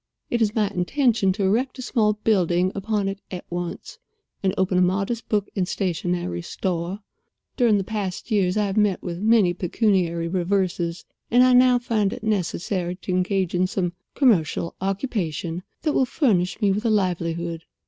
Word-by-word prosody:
It 235 - +1
is 215 -1 +1
my 215 -2 +2
intention 210 +2 +1
to 200 +1 -2
erect 240 +8 +1
a 255 - -6
small 220 -4 +2
building 185 -4 +1
upon 205 0 -1
it 195 0 -4
at 180 -1 -7
once, 175 0 -5 0.4
and 190 - +2
open 185 -1 +2
a - - +4
modest 195 +5 0
book 205 -2 +1
and 185 -3 0
stationery 175 - -2
store. 180 - -3 0.5
During 220 -6 +3
past 200 +1 -4
years 195 -2 +2
I 210 - +2
have 200 +1 -3
met 210 -3 +2
with 175 -1 -4
many 215 -4 +4
pecuniary 180 -2 0
reverses, 175 -1 -1 0.2
and 245 +2 +5
I 255 0 +5
now 250 0 +6
find 220 -5 0
it - - -8
necessary 180 -3 -1
to 185 - -6
engage 185 0 0
in 180 +1 +2
some 180 -2 -2 0.2
commercial 175 - +2
occupation 185 - -2 0.2
that 305 -2 +1
will 265 - +3
furnish 205 - +1
me 205 -2 +3
with 205 +3 -1
a 230 - +1
livelihood. 170 -4 -1
195 Hz, 170 wpm, -23 LUFS, 180-215 Hz, 0.5 s, now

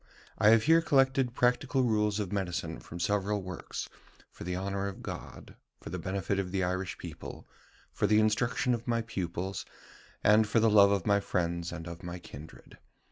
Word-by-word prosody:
I 105 - +6
have 115 0 +6
here 165 +2 +5
collected 135 -5 +2
practical 125 +2 +2
rules 105 -3 +1
of 100 -4 -3
medicine 85 -4 -3
from 85 - -9
several 100 +3 0
works, 90 -2 -6 0.4
for - - -10
the 90 +1 -3
honour 100 +1 -2
of 100 - -7
God, - - -8 0.2
for - - -9
the - - -3
benefit 100 +1 -2
of 90 -2 -3
the 95 0 0
Irish 95 +1 -2
people, - - -9 0.5
for - - +1
the 105 0 +5
instruction 120 +3 +1
of 120 +1 -4
my 115 -1 +1
pupils, 95 -3 -4 0.6
and 105 +1 +5
for 110 +2 +2
the 110 0 +4
love 100 -1 +7
of 100 -3 0
my 100 -1 +4
friends 85 -3 -2
and 85 -1 -6
of 85 0 -8
my 90 0 -6
kindred. 80 -2 -12
100 Hz, 185 wpm, -30 LUFS, 90-110 Hz, 0.6 s, love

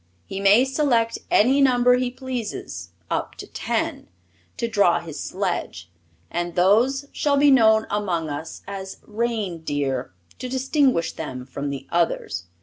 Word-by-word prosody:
He 195 - -5
may 200 +6 +5
select 260 -5 +1
any 265 +6 +4
number 250 -2 +5
he 250 0 0
pleases, 250 -3 -5 0.2
up - - -2
to - - -8
ten, - - -3 0.5
to 235 - -1
draw 200 -6 +3
his 160 -4 -8
sledge, 85 +1 -3 0.4
and 175 0 -3
those 230 +10 +3
shall 285 -1 +1
be 285 0 +6
known 220 -4 +5
among 185 -6 -1
us 150 +2 -6
as 195 -1 -6
Reindeer, 165 - -2 0.3
to 255 - -5
distinguish 260 - +1
them 130 -5 -6
from 140 +2 -5
the 140 -1 -5
others. 165 - 0
210 Hz, 140 wpm, -23 LUFS, 165-250 Hz, 0.5 s, be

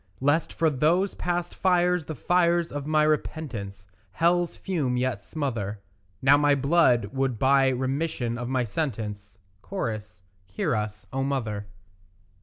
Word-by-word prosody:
Lest 145 +4 +1
for 160 -1 +1
those 165 +8 +2
past 175 0 -2
fires 180 -2 +2
the 155 - -5
fires 170 +2 +2
of 145 0 -5
my 155 0 +3
repentance 120 -10 -2 0.3
Hell's 175 +1 +1
fume 145 -10 -1
yet 125 -5 -1
smother, 115 -8 -3 0.4
Now 140 +2 +7
my 145 -1 +4
blood 135 - +3
would 135 -3 0
buy 135 +2 +4
remission 130 -1 -1
of 120 0 -4
my 130 -1 +1
sentence; 105 -6 -4 0.3
(Cho.) 115 - -2 0.5
Hear 95 +5 -1
us, 105 -2 -4
O 135 - -1
mother. 110 -7 -2
135 Hz, 135 wpm, -26 LUFS, 115-160 Hz, 0.5 s, Now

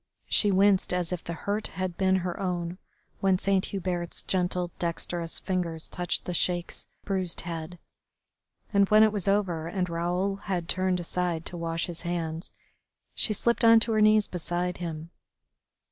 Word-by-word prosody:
She 205 - +3
winced 195 -1 +4
as 180 -1 -1
if 180 -1 -3
the 170 - -4
hurt 205 +2 0
had 185 -2 -4
been 190 0 +3
her 175 - -3
own 180 -1 -2 0.4
when 190 -1 +3
Saint 195 0 +1
Hubert's 175 -3 -3
gentle, 180 -1 0
dexterous 170 0 -2
fingers 170 -4 -2
touched 175 -1 -2
the 180 - -3
Sheik's 175 +1 -1 0.2
bruised 185 -3 0
head. 170 0 -6 1.0
And 200 -1 +4
when 215 +1 +7
it 215 - +5
was 205 -3 -3
over 185 -5 +1
and 180 +1 -1
Raoul 180 +4 -1
had 185 -4 -3
turned 185 0 +1
aside 175 -1 -2
to - - -5
wash 165 -1 -2
his 170 -2 -4
hands, 170 -1 -3 0.6
she - - +2
slipped 235 +3 +1
on 230 0 +8
to 225 - 0
her 215 -1 +3
knees 215 0 +5
beside 180 +1 -2
him. 165 -1 -6
180 Hz, 160 wpm, -28 LUFS, 170-195 Hz, 1.0 s, on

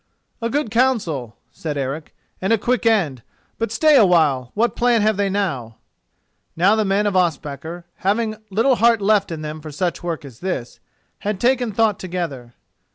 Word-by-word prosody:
"A 230 - -1
good 285 -3 -1
counsel," 205 - 0 0.2
said 150 0 -5
Eric, 140 +3 -4 0.3
"and 190 - 0
a 225 - +5
quick 240 +2 0
end; 170 - +2 0.4
but 230 -2 -1
stay 305 +5 +4
a 250 - +7
while: 150 -9 +3
what 230 +3 +1
plan 240 -3 +3
have 215 0 +3
they 200 0 0
now?" 160 - -2 0.8
Now 185 +6 +4
the 220 - +1
men 200 +1 +1
of 205 -2 0
Ospakar, 160 -1 -1
having 215 +2 0
little 230 +6 +2
heart 230 -1 +4
left 205 -2 +2
in 155 -2 -5
them 155 +1 -6
for 155 0 -8
such 175 +4 -2
work 170 -4 -4
as 130 -4 -12
this, 175 -10 -4 0.4
had 205 -2 -3
taken 245 -1 +2
thought 215 -1 +1
together. 165 -10 -5
195 Hz, 175 wpm, -21 LUFS, 155-225 Hz, 0.8 s, a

